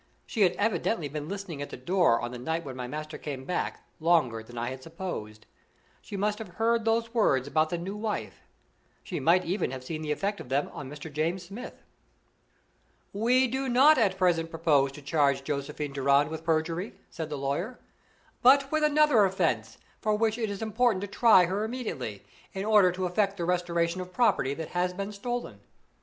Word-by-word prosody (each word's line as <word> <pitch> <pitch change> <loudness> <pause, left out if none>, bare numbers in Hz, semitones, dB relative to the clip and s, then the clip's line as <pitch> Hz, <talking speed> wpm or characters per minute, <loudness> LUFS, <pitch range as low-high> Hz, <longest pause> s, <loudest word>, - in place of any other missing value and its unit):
She 225 - -3
had 185 - +4
evidently 215 -5 0
been 150 +2 -5
listening 195 -7 -5
at 145 - -5
the - - -7
door 175 -10 +3
on 120 0 -4
the 125 - -7
night 160 +6 -2
when 130 -2 -6
my 125 -1 -5
master 155 +3 -6
came 135 -3 -6
back 180 - -3 0.2
longer 155 -9 +2
than 120 +2 -12
I 120 +2 -2
had 130 0 -7
supposed. 130 - -6 0.6
She 200 - -7
must 210 +2 0
have 190 -6 -9
heard 230 0 +1
those 230 +1 +1
words 140 - +2
about 155 +2 +2
"the 175 - -2
new 185 +4 -5
wife" 210 0 -4 0.6
she - - -4
might 180 +2 +3
even 185 -2 -1
have 130 0 -6
seen 155 +4 -5
the 150 -1 -3
effect 200 +6 -1
of - - -9
them 140 +2 0
on 140 -2 -7
Mr. 150 +1 -9
James 165 +5 -1
Smith. 200 +8 -9 1.3
"We 245 +5 +3
do 265 +2 -2
not 270 +4 +6
at 195 -4 +2
present 170 -3 +2
propose 155 -5 +2
to 145 - -11
charge 140 -2 +2
Josephine 145 +1 -4
Durand 140 +2 +3
with 160 0 -5
perjury," 165 +4 -1 0.2
said 160 -2 -5
the 150 - -4
lawyer, 145 - -2 0.6
"but 270 +2 +5
with 310 0 +1
another 300 -6 +5
offense, 160 - 0 0.2
for 215 -1 +1
which 220 +1 +1
it 220 -2 -1
is 200 +2 -4
important 220 -2 +1
to 205 - -3
try 205 -2 +5
her 195 +4 -1
immediately, 170 - -5 0.3
in 195 +1 -3
order 210 -4 +5
to 185 +1 -3
effect 195 +2 0
the 170 - -2
restoration 175 0 0
of 180 0 -8
property 180 - +2
that 160 0 -6
has 180 0 0
been 200 +2 -4
stolen. 210 - -4
175 Hz, 195 wpm, -28 LUFS, 145-210 Hz, 1.3 s, not